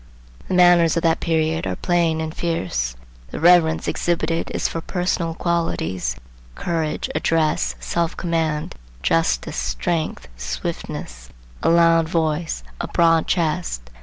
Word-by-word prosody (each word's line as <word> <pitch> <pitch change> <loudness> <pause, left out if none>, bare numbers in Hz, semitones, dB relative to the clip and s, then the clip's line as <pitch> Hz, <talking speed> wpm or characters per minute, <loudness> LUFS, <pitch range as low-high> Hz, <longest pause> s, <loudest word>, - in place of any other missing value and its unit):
The 185 - -1
manners 175 -2 +5
of 170 - 0
that 165 -1 +3
period 160 - 0
are 95 - -2
plain 165 - +1
and 160 0 -4
fierce. 90 - -2 0.3
The - - -6
reverence 165 -1 +4
exhibited 170 -1 -1
is - - -1
for 165 - -4
personal 175 -2 -1
qualities; 95 - -1 0.4
courage, 165 -3 -2
address, 155 - +1
self 165 - -2
command, 160 -3 -1 0.3
justice, 65 -7 +1
strength, 65 - -2
swiftness, - - -5 0.3
a - - +2
loud 165 -1 +4
voice, 160 - -1 0.2
a - - -3
broad 165 -1 +3
chest. 155 - -1
160 Hz, 125 wpm, -22 LUFS, -, 0.4 s, manners